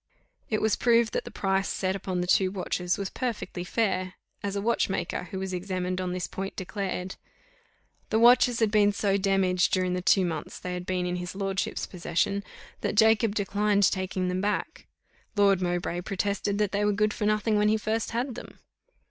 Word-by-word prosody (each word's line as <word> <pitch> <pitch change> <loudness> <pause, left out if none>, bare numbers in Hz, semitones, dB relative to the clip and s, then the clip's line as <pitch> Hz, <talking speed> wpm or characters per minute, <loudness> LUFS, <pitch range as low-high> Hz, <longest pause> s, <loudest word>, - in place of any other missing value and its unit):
It 215 - 0
was 220 - +3
proved 235 -2 +3
that - - -2
the - - -6
price 195 0 0
set 190 0 -1
upon 185 -2 -2
the - - -1
two 185 +1 +3
watches 180 -2 -2
was 195 -1 -4
perfectly 230 -7 -4
fair, 185 -2 -1 0.3
as 200 0 -3
a 200 - -1
watchmaker, 200 -5 -1
who 190 - -7
was 190 0 -4
examined 185 0 -2
on 180 -1 -2
this 180 -1 -2
point, 195 +1 -5
declared. 190 -1 -4 0.9
The 220 - +2
watches 240 0 +5
had 220 -2 +3
been 205 -1 +4
so 200 -1 +1
damaged 190 -2 +2
during 185 -1 +1
the 180 - -1
two 185 +1 +4
months 160 -3 -4
they 180 - -5
had 180 0 -5
been 180 -1 -1
in 180 0 -2
his 180 +1 -6
lordship's 195 -1 -2
possession, 180 +3 -1 0.4
that - - -2
Jacob 220 -1 +4
declined 205 0 +1
taking 185 -1 -2
them 180 +1 -1
back. 205 +1 -2 0.5
Lord 200 -2 +4
Mowbray 175 0 -1
protested 200 +2 -1
that 210 -2 +1
they 205 +1 0
were 210 0 +2
good 210 +1 +1
for 210 - -2
nothing 215 +1 +1
when 210 0 +3
he 215 - +3
first 220 +1 -1
had 245 +3 -2
them. - - -10
195 Hz, 190 wpm, -27 LUFS, 185-210 Hz, 0.9 s, watches